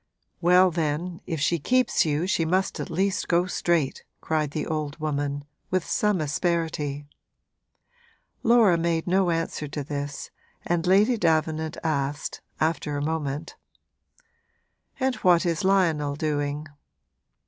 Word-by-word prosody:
'Well, 180 Hz, +1 st, +5 dB
then, 165 Hz, +2 st, -2 dB
if 165 Hz, -4 st, -2 dB
she 165 Hz, +3 st, +1 dB
keeps 255 Hz, -, +2 dB
you 150 Hz, +3 st, 0 dB
she 185 Hz, -3 st, +1 dB
must 185 Hz, +4 st, 0 dB
at -, -, -4 dB
least 190 Hz, +4 st, 0 dB
go 175 Hz, +1 st, +3 dB
straight!' 170 Hz, -5 st, 0 dB, 0.2 s
cried 155 Hz, -2 st, -1 dB
the 150 Hz, +1 st, -3 dB
old 155 Hz, -1 st, -3 dB
woman, 145 Hz, -2 st, -2 dB, 0.2 s
with 185 Hz, -2 st, 0 dB
some 210 Hz, -5 st, +1 dB
asperity. 155 Hz, -2 st, -1 dB, 1.4 s
Laura 225 Hz, -7 st, +5 dB
made 165 Hz, -1 st, 0 dB
no 185 Hz, 0 st, +2 dB
answer 165 Hz, -2 st, -2 dB
to 145 Hz, 0 st, -4 dB
this 145 Hz, 0 st, -5 dB, 0.3 s
and 175 Hz, 0 st, 0 dB
Lady 210 Hz, +6 st, +4 dB
Davenant 160 Hz, -3 st, 0 dB
asked, 145 Hz, -2 st, -2 dB, 0.2 s
after 155 Hz, -2 st, 0 dB
a 145 Hz, -, -2 dB
moment: 155 Hz, -1 st, -3 dB, 1.4 s
'And 265 Hz, -1 st, +1 dB
what 175 Hz, -1 st, +4 dB
is 165 Hz, -2 st, 0 dB
Lionel 165 Hz, -7 st, +2 dB
doing?' 145 Hz, -1 st, -2 dB
160 Hz, 125 wpm, -25 LUFS, 150-180 Hz, 1.4 s, Well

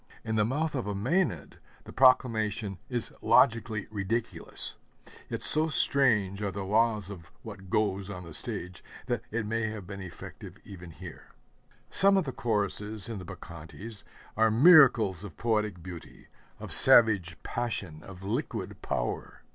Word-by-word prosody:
In 110 Hz, 0 st, -3 dB
the 105 Hz, -, +3 dB
mouth 150 Hz, +8 st, -1 dB
of 125 Hz, -7 st, -3 dB
a 100 Hz, -, -3 dB
Mænad 120 Hz, -, -1 dB, 0.3 s
the -, -, -12 dB
proclamation 110 Hz, -6 st, +2 dB
is 120 Hz, -3 st, -4 dB
logically 110 Hz, -2 st, +2 dB
ridiculous; 110 Hz, +3 st, -3 dB, 0.5 s
yet -, -, -4 dB
so 155 Hz, +1 st, +5 dB
strange 110 Hz, -11 st, +2 dB
are 105 Hz, -, -1 dB
the 95 Hz, +1 st, -5 dB
laws 105 Hz, -1 st, +1 dB
of 85 Hz, -5 st, -11 dB
what 95 Hz, -1 st, -10 dB
'goes' 100 Hz, -1 st, -1 dB
on 90 Hz, -3 st, -7 dB
the 85 Hz, -2 st, -11 dB
stage 90 Hz, +3 st, -4 dB, 0.2 s
that -, -, -2 dB
it 110 Hz, 0 st, -3 dB
may 110 Hz, +1 st, -1 dB
have 105 Hz, -3 st, -7 dB
been 100 Hz, +1 st, -8 dB
effective 90 Hz, -3 st, -10 dB
even 90 Hz, -3 st, -11 dB
here. 85 Hz, 0 st, -12 dB, 0.6 s
Some 195 Hz, 0 st, +4 dB
of 190 Hz, -, +1 dB
the 135 Hz, -, -4 dB
choruses 105 Hz, -2 st, -3 dB
in 110 Hz, -4 st, -5 dB
the 90 Hz, -, -9 dB
Bacchantes 85 Hz, +7 st, -10 dB, 0.3 s
are 110 Hz, +1 st, +3 dB
miracles 120 Hz, -, +5 dB
of 100 Hz, -6 st, -10 dB
poetic 105 Hz, -6 st, -1 dB
beauty, 90 Hz, -2 st, -11 dB, 0.3 s
of -, -, -2 dB
savage 100 Hz, -8 st, +6 dB
passion, 100 Hz, -10 st, -4 dB
of 95 Hz, -1 st, -12 dB
liquid 115 Hz, +10 st, -4 dB
power. -, -, -4 dB
105 Hz, 150 wpm, -28 LUFS, 95-115 Hz, 0.6 s, savage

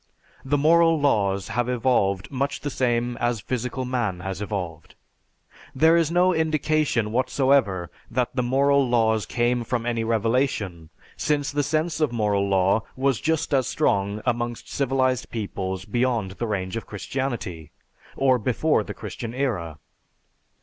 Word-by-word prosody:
The 145 Hz, +2 st, +1 dB
moral 165 Hz, +2 st, +4 dB
laws 100 Hz, -9 st, +1 dB
have 120 Hz, 0 st, -1 dB
evolved 110 Hz, -6 st, +1 dB
much 140 Hz, +1 st, -2 dB
the 145 Hz, -, -3 dB
same 120 Hz, -2 st, 0 dB
as 120 Hz, -1 st, 0 dB
physical 125 Hz, +3 st, -3 dB
man 120 Hz, -8 st, -2 dB
has 95 Hz, +1 st, -5 dB
evolved. 90 Hz, -6 st, -5 dB, 0.8 s
There 160 Hz, +4 st, +5 dB
is 165 Hz, -2 st, +3 dB
no 180 Hz, +2 st, +3 dB
indication 155 Hz, -8 st, +1 dB
whatsoever 125 Hz, -7 st, +1 dB, 0.2 s
that 125 Hz, +1 st, -1 dB
the 125 Hz, -, +1 dB
moral 135 Hz, +2 st, +3 dB
laws 110 Hz, -3 st, +2 dB
came 120 Hz, 0 st, 0 dB
from 115 Hz, 0 st, -2 dB
any 115 Hz, -1 st, -1 dB
revelation 110 Hz, -, 0 dB, 0.3 s
since 145 Hz, -2 st, 0 dB
the 145 Hz, 0 st, 0 dB
sense 155 Hz, +2 st, -1 dB
of 150 Hz, -5 st, +2 dB
moral 105 Hz, -4 st, +1 dB
law 95 Hz, +2 st, +3 dB
was 135 Hz, -2 st, 0 dB
just 160 Hz, -2 st, 0 dB
as 130 Hz, -3 st, +2 dB
strong 100 Hz, +2 st, 0 dB
amongst 120 Hz, -1 st, -2 dB
civilized 130 Hz, -2 st, 0 dB
peoples 95 Hz, -4 st, -4 dB
beyond 120 Hz, -3 st, 0 dB
the 115 Hz, +5 st, -4 dB
range 95 Hz, -2 st, -2 dB
of 115 Hz, -, -5 dB
Christianity, 105 Hz, -, -4 dB, 0.5 s
or 130 Hz, -2 st, +3 dB
before 130 Hz, +7 st, +1 dB
the -, -, -7 dB
Christian 115 Hz, -1 st, -6 dB
era. 95 Hz, -, -2 dB
120 Hz, 145 wpm, -24 LUFS, 105-135 Hz, 0.8 s, There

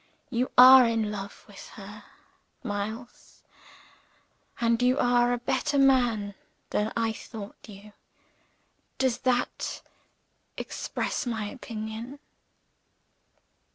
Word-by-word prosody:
You 250 Hz, +1 st, 0 dB
are 255 Hz, +1 st, +10 dB
in 225 Hz, -2 st, 0 dB
love 200 Hz, -1 st, -8 dB
with 205 Hz, -2 st, -12 dB
her, 205 Hz, 0 st, -11 dB, 0.6 s
Miles; 220 Hz, +2 st, -6 dB, 1.2 s
and 230 Hz, 0 st, +1 dB
you 250 Hz, +2 st, +3 dB
are 245 Hz, -3 st, +3 dB
a 245 Hz, -, +1 dB
better 285 Hz, +4 st, -1 dB
man 245 Hz, -7 st, +3 dB, 0.4 s
than 210 Hz, +1 st, 0 dB
I 225 Hz, -1 st, 0 dB
thought 215 Hz, -1 st, -10 dB
you. 205 Hz, +1 st, -13 dB, 1.0 s
Does 260 Hz, -3 st, 0 dB
that 250 Hz, -1 st, -1 dB, 0.7 s
express -, -, -4 dB
my 220 Hz, -3 st, -2 dB
opinion?" 225 Hz, +1 st, -7 dB
230 Hz, 95 wpm, -27 LUFS, 210-250 Hz, 1.2 s, are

